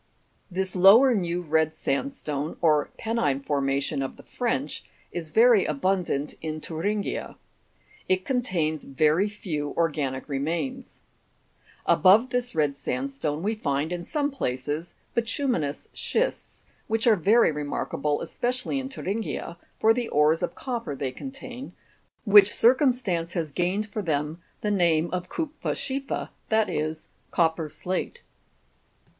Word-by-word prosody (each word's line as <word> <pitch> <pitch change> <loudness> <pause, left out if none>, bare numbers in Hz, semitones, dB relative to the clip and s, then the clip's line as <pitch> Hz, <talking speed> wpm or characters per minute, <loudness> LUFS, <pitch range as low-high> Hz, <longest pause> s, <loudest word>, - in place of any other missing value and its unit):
24. 185 0 -5
This 190 -1 0
lower 215 +8 +7
new 175 -4 -1
red 160 0 +1
sandstone, 150 - -2
or 155 -3 +3
penine 150 - -1
formation 140 0 0
of 135 - -4
the - - -13
French, 155 - -2 0.3
is 170 -3 -5
very 230 +2 +6
abundant 155 -1 0
in 155 -1 -4
Thuringia. 200 +7 -3 0.7
It 185 0 +2
contains 175 - 0
very 155 +8 +2
few 155 -8 -4
organic 145 -5 -1
remains. 170 - -3 0.8
Above 215 +7 +5
this 245 0 -1
red 150 -3 +2
sandstone 140 +4 -3
we 215 +3 +1
find, 150 -6 -1
in 175 -1 -4
some 290 - -1
places, 145 - -3 0.2
bituminous 230 - -1
schists, - - -2 0.2
which 225 0 0
are 230 -3 +6
very 205 +3 +4
remarkable, 150 0 -2
especially 250 +2 -2
in 265 0 -5
Thu 270 - -8
ringia, 200 -3 -3 0.2
for 220 +1 +5
the 240 0 -2
ores 150 0 +3
of - - -2
copper 235 - -4
they 135 -1 -3
contain, 265 - -8 0.5
which 205 -2 +8
circumstance 240 - +2
has 165 -5 -2
gained 185 +7 0
for 210 0 -4
them 155 -1 -2 0.2
the 210 - 0
name 170 -4 +2
of 180 0 -3
kupfer 315 -2 -3
s - - -6
chief 275 +1 -3
er, - - -2 0.2
that 220 -1 +2
is, 155 +1 -3 0.2
copper 160 -2 +1
slate. 185 - -4
175 Hz, 135 wpm, -26 LUFS, 150-225 Hz, 0.8 s, which